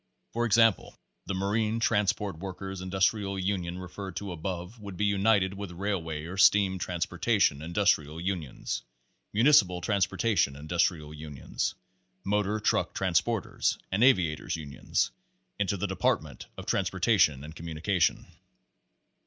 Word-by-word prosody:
For 120 +1 +1
exam 115 0 +6
Pasre - - -19
Thirteen - - -14
pie, - - -30 0.3
the - - -2
Marine 105 +4 0
Transport 105 -5 0
Workers' 95 0 -6
Industrial 95 +2 0
Unions 90 -2 -2
referred 95 0 -7
to 100 +1 -4
above 90 +5 -5
would 100 -3 -8
be 105 - +1
united 100 -1 +3
with 100 -1 -6
Railway 85 -5 -3
or 90 +3 -7
Steam 95 -1 +5
Transportation 90 -1 +1
Industrial 80 -3 +1
Unions, 85 -6 -3 0.5
Municipal 105 -7 +5
Transportation 100 -4 +1
Industrial 75 0 -1
Unions, 75 +1 -4 0.5
Motor 105 +1 0
Truck 105 - 0
Trans - - +2
porters, - - -1
and 100 +5 +2
Aviators' 90 - +3
Unions, 75 -3 -2 0.5
Into 100 -1 0
the 95 - -2
"Department 80 -7 -1
of - - -7
Transportation 95 - +2
and 80 +2 -9
Communication." 85 +2 0
95 Hz, 130 wpm, -28 LUFS, 85-100 Hz, 0.5 s, exam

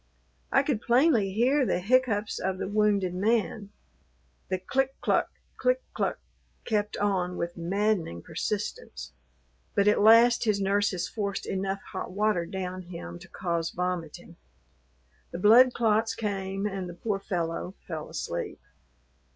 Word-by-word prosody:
I 275 - +4
could 275 -6 -1
plainly 240 -5 +3
hear 255 +8 +3
the 235 - +1
hiccoughs 220 0 +1
of 190 0 -2
the - - -3
wounded 205 -3 +1
man: 210 +1 0 0.8
the 185 - 0
click 270 +8 -1
cluck, - - +1 0.3
click - - +1
cluck, - - -1 0.5
kept 210 -1 -1
on 185 -3 0
with 170 0 -3
maddening 180 - -1
persistence, 60 +1 -4 0.6
but 200 0 +3
at 210 - +4
last 230 +3 +6
his 210 -2 +2
nurses 195 -2 +1
forced 200 -3 -3
enough 195 0 -2
hot - - -4
water 200 -3 +1
down 185 0 -4
him 170 - -8
to - - -13
cause 170 -3 -2
vomiting. 180 -3 -4 0.9
The - - -5
blood 230 +7 +7
clots 225 -1 +1
came 195 -2 -3
and 190 -3 -3
the 175 - -8
poor 200 +1 -2
fellow 180 -1 -3
fell 160 -3 -5
asleep. 85 - -4
200 Hz, 135 wpm, -28 LUFS, 180-220 Hz, 0.9 s, blood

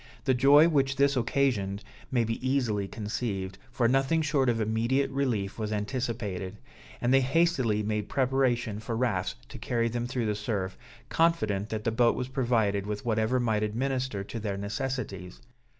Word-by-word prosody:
The 130 - +3
joy 140 +5 +6
which 135 -4 +2
this 140 +1 +3
occasioned 115 -6 0 0.3
may 125 -3 +2
be 115 +2 -3
easily 110 -7 0
conceived, 105 -3 -4
for 120 -1 +1
nothing 135 +6 +2
short 135 -3 +2
of 115 -1 +1
immediate 115 +6 +1
relief 120 -8 -1
was 110 -1 -2
anticipated; 105 -4 -3 0.4
and 125 +2 +1
they 135 - +6
hastily 130 -7 +2
made 105 0 -2
preparation 125 -5 +1
for 110 +1 -4
rafts 115 -7 0
to - - -9
carry 115 -1 0
them 120 +1 -2
through 125 -2 -2
the 105 - +1
surf, 100 -3 -3 0.3
confident 110 -12 +1
that 110 -1 -3
the 115 - +1
boat 115 +1 +3
was 125 0 -3
provided 115 -7 +1
with 105 +1 -4
whatever 110 +2 +1
might 110 -3 +1
administer 125 0 -1
to 115 +3 -6
their 100 -2 -3
necessities. 100 -3 -4
115 Hz, 165 wpm, -28 LUFS, 105-130 Hz, 0.4 s, joy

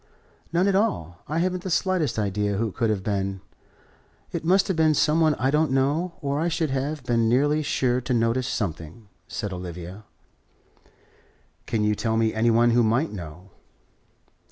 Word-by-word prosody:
"None 175 +3 +2
at 200 - +2
all. 140 - -1
I 155 - -2
haven't 185 +1 0
the 185 - -5
slightest 175 -6 0
idea 105 -1 -1
who 115 +1 0
it - - -14
could 115 - +1
have 100 -3 -1
been. 100 -1 -2 0.9
It - - -4
must 190 +4 +3
have 190 - 0
been 160 -1 +3
some 150 +3 +2
one 155 -2 +4
I 130 +1 0
don't 155 +1 +2
know, 145 +7 0
or 140 0 -1
I 165 - +1
should 160 -3 -1
have 140 +2 -2
been 115 -2 +1
nearly 145 +5 +2
sure 130 -4 0
to 125 +1 -2
notice 115 +2 +1
something," 85 - -4 0.2
said 105 -2 -4
Olivia. 90 +3 -8 1.6
"Can 110 -2 0
you 105 0 +2
tell 110 +1 -1
me 110 -1 +1
any 110 +2 +2
one 120 +1 +4
who 120 +1 +4
might 120 +8 +1
know?" 90 0 -9
120 Hz, 180 wpm, -25 LUFS, 105-155 Hz, 1.6 s, one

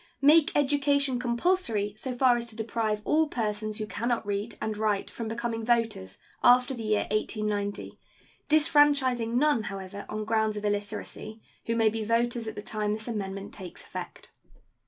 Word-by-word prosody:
Make 300 +2 +6
education 280 -2 +2
compulsory 235 - 0
so 250 +3 -4
far 250 -1 +4
as 235 0 -3
to 220 - -12
deprive 220 -1 -2
all 315 +1 +3
persons 215 -4 -2
who 215 - -3
can 220 +2 -4
not 240 -3 0
read 205 +2 -3
and 220 -1 -2
write 210 -2 -1
from 230 - -5
becoming 225 0 -3
voters 225 - 0 0.2
after 250 +2 +5
the 240 - -6
year 215 -1 0
1890, 210 -1 -2 0.5
disfranchising 285 -6 +3
none, 295 -3 +3
however, 195 0 -7
on 215 0 -3
grounds 220 -1 +1
of 210 - -4
illiteracy 210 +1 -4 0.3
who 230 - 0
may 225 -1 +4
be 220 0 -3
voters 235 +1 0
at 220 - -5
the 205 - -6
time 210 -1 -1
this 215 +1 -4
amendment 195 -3 -4
takes 185 -4 -9
effect. - - -8
225 Hz, 165 wpm, -28 LUFS, 210-245 Hz, 0.5 s, Make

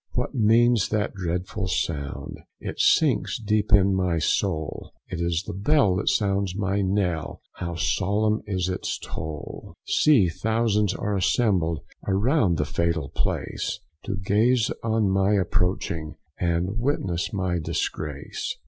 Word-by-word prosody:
what 125 +2 -2
means 115 -2 +4
that 105 -1 -1
dreadful 90 +2 -3
sound? 70 -6 -3 0.2
It - - -6
sinks - - +3
deep 105 -1 0
in 100 -1 +5
my 90 -3 +1
soul; 80 -1 -1
It 90 -2 -4
is 85 0 0
the 105 - -5
bell 100 0 +3
that 105 - +1
sounds 100 -2 +1
my 100 0 0
knell, 95 -4 -1 0.2
How 85 -1 -4
solemn 105 +5 +1
is 95 -3 -1
the 95 0 -2 0.2
toll. 80 0 -7
See 135 -12 +4
thousands 105 +2 +1
are 105 0 -2
assembled 90 - +1 0.3
Around 100 - +2
the 75 - 0
fatal 80 -1 -1
place, - - -2 0.3
To - - -2
gaze 110 +5 +2
on 110 -2 +1
my 95 +1 +2
approaching, 90 -3 0 0.2
And 90 +5 0
witness 100 - -1
my 95 -3 -1
disgrace. 75 -2 -3
95 Hz, 130 wpm, -25 LUFS, 85-105 Hz, 0.3 s, in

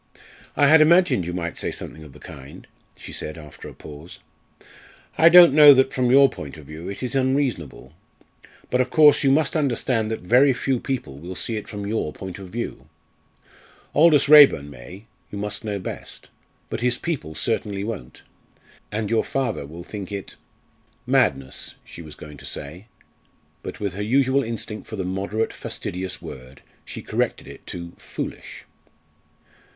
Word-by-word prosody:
"I 145 - +5
had 155 +3 +7
imagined 170 - +4
you 90 - -4
might 85 -1 -4
say - - -2
something 80 - -7
of 75 - -13
the - - -15
kind," 70 +1 -12 0.3
she - - -10
said 75 - -5
after 75 -3 -11
a - - -12
pause. 75 +3 -11 1.0
"I 165 - +6
don't 175 -3 +9
know 145 -1 +9
that, 130 +1 +2
from 125 -1 +1
your 140 +2 +7
point 75 - -9
of 75 - -13
view, 80 +5 -8
it 100 - -7
is 125 - -3
unreasonable. 130 - -1 0.8
But, 125 - +3
of 130 - -1
course, 150 +1 +5
you 135 - +4
must 145 +2 +2
understand 125 -6 0
that 110 - -4
very 125 +9 +4
few 130 0 -1
people 115 - -5
will 90 +4 -8
see 115 - -2
it 105 - -5
from 100 -2 -6
your 105 -7 -2
point 95 -1 -8
of 95 -2 -10
view. 95 - -6 1.1
Aldous 155 -1 +5
Raeburn 140 - +7
may 80 - -12 0.2
you 100 - -7
must 105 +1 -4
know 105 -2 -3
best. 95 - -9 0.4
But - - -3
his 125 0 +1
people 140 - -4
certainly 100 +3 -2
won't; 100 - -7 0.7
and 105 0 -2
your 115 +1 +1
father 120 - -3
will 85 +4 -10
think 100 +1 -7
it 100 -1 -7 0.4
" - - -39
"Madness," 65 -1 -1
she - - -11
was 75 -2 -11
going 75 -1 -11
to 70 - -12
say, 85 +9 -7 0.7
but - - -8
with 100 -3 -3
her 100 - -5
usual 130 +4 +2
instinct 110 -2 -6
for 110 - -6
the 95 -3 -4
moderate 100 +4 -2
fastidious 90 0 -6
word 65 +1 -11 0.2
she - - -8
corrected - - -2
it - - -13
to 85 -1 -7
"foolish." - - -7
105 Hz, 170 wpm, -23 LUFS, 85-130 Hz, 1.1 s, don't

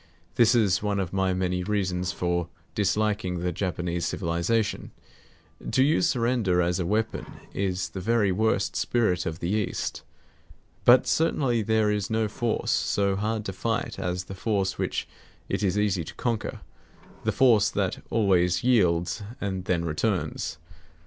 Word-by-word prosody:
This 120 +1 +4
is 100 -6 +3
one 105 -1 0
of 95 -2 -3
my 95 -1 +1
many 90 -1 -1
reasons 95 -2 -1
for 85 -1 -1 0.3
disliking 105 -2 0
the 90 0 0
Japanese 90 -1 -2
civilization. 90 +5 -1 0.8
To 130 - +3
use 160 +3 +3
surrender 115 - +1
as 90 +1 +1
a 85 - -1
weapon 110 +3 -1 0.3
is 95 -2 -1
the 95 - -6
very 105 -1 +2
worst 105 0 +1
spirit 100 -7 +1
of 80 0 -3
the 85 - -1
East. 105 -2 -2 0.8
But 125 +1 +7
certainly 135 -7 +1
there 110 0 +2
is 105 -2 -1
no 110 -1 +1
force 115 +2 -1
so 100 -1 +1
hard 110 +2 -2
to 95 - -4
fight 115 +8 -2
as 90 0 -2
the 95 - -9
force 95 -1 -1
which - - -2 0.4
it - - -2
is 100 -1 +1
easy 100 -4 +1
to - - -9
conquer; 115 -3 -2 0.6
the - - +1
force 120 -6 +4
that - - -2
always 90 -5 +2
yields 90 -7 +2 0.2
and 95 -2 -3
then 85 -2 0
returns. 85 -1 -1
100 Hz, 150 wpm, -26 LUFS, 90-110 Hz, 0.8 s, But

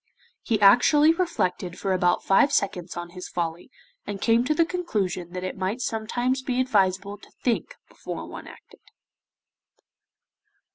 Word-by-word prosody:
He 220 -3 0
actually 290 +10 +6
reflected 195 - -2
for 195 -1 -1
about 180 -1 +1
five 270 +9 +4
seconds 180 -8 -1
on 175 0 -6
his 180 0 -8
folly, 170 +2 -4 0.4
and 200 - -4
came 230 +2 +3
to 305 +3 +1
the 335 - +3
conclusion 210 - -2
that 180 0 -5
it 185 - -4
might 190 +6 -2
sometimes 240 +3 -1
be 255 -1 -2
advisable 200 -4 +1
to - - -17
think 240 -3 -1
before - - -7
one - - -9
acted. - - -16
205 Hz, 145 wpm, -25 LUFS, 185-255 Hz, 0.4 s, actually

